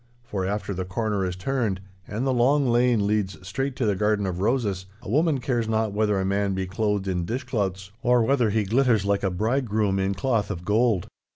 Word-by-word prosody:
For 100 -6 -3
after 100 0 -2
the 95 0 -3
corner 100 +2 -1
is 90 - -4
turned 105 -1 -1 0.3
and 110 +5 -3
the 135 - +2
long 135 +3 +3
lane 120 -3 +3
leads 100 -2 0
straight 135 +7 -2
to 125 - -1
the 105 -2 +2
garden 105 0 +1
of 90 -2 -3
roses, 100 -5 0 0.2
a - - -7
woman 150 +1 +2
cares 120 -2 -1
not 110 -1 0
whether 105 -1 +1
a 95 - 0
man 100 0 0
be 95 0 -1
clothed 100 +1 -1
in 90 -2 -1
dishclouts 95 -3 -3
or 120 -1 +4
whether 125 -2 +2
he 110 +1 +1
glitters 115 -1 +2
like 100 0 +1
a 95 - +1
bridegroom 110 0 0
in 95 +1 0
cloth 110 0 0
of 90 -3 -5
gold. 105 -2 +2
105 Hz, 205 wpm, -25 LUFS, 95-120 Hz, 0.3 s, or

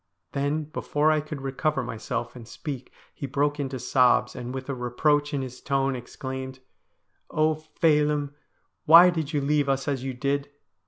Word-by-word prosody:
Then 145 +2 -1
before 150 0 0
I 155 -1 +2
could 150 -2 -7
recover 135 +1 -1
myself 115 0 -4
and 120 -2 -10
speak 135 -1 -7 0.2
he 140 - -5
broke 145 +2 0
into 135 -2 -3
sobs, 125 0 +3
and 125 0 -5
with 130 0 -6
a 140 - -2
reproach 145 +4 +1
in 140 -2 -1
his 125 -1 -8
tone 135 -1 0
exclaimed: 130 +1 -6 0.4
' - - -49 0.2
Oh, 155 0 +2
Phelim, 150 -2 +1 0.5
why 170 +3 +9
did 160 -4 -3
you 145 -3 0
leave 145 0 +1
us 135 0 0
as 135 -3 -1
you 135 -1 -4
did 140 +2 -1
140 Hz, 170 wpm, -26 LUFS, 130-150 Hz, 0.5 s, why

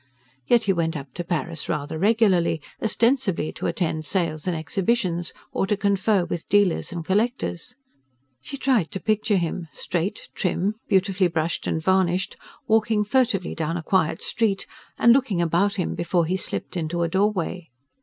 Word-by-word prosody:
Yet 240 -1 +4
he 195 - +2
went 165 -2 -1
up 135 -2 -9
to 175 - -4
Paris 170 -2 -3
rather 150 -1 -2
regularly: 195 -5 +3 0.2
ostensibly 230 - +1
to - - -4
attend 160 -3 -1
sales 165 -1 -1
and 175 -2 0
exhibitions, 175 0 -1 0.2
or 195 - 0
to 210 0 +1
confer 200 -1 +2
with 170 - -5
dealers 205 -3 +2
and 170 -2 -5
collectors. 215 +1 -1 0.7
She 275 - -7
tried 255 - +2
to 195 - -3
picture 215 0 +1
him, 170 0 -2
straight, 185 +3 -3
trim, 190 +1 0
beautifully 190 -1 +2
brushed 165 -1 -2
and - - 0
varnished, 190 +1 +1 0.3
walking 220 -1 +2
furtively 220 -5 +1
down 165 +1 -2
a 165 - -5
quiet 160 -2 +1
street, 210 -4 0 0.3
and 235 - +6
looking 245 -9 +1
about 175 +5 +2
him 180 -4 -1
before 170 0 +1
he 180 +3 0
slipped 190 - -4
into 170 0 -1
a - - +1
doorway. 185 -2 -1
185 Hz, 160 wpm, -24 LUFS, 170-210 Hz, 0.7 s, and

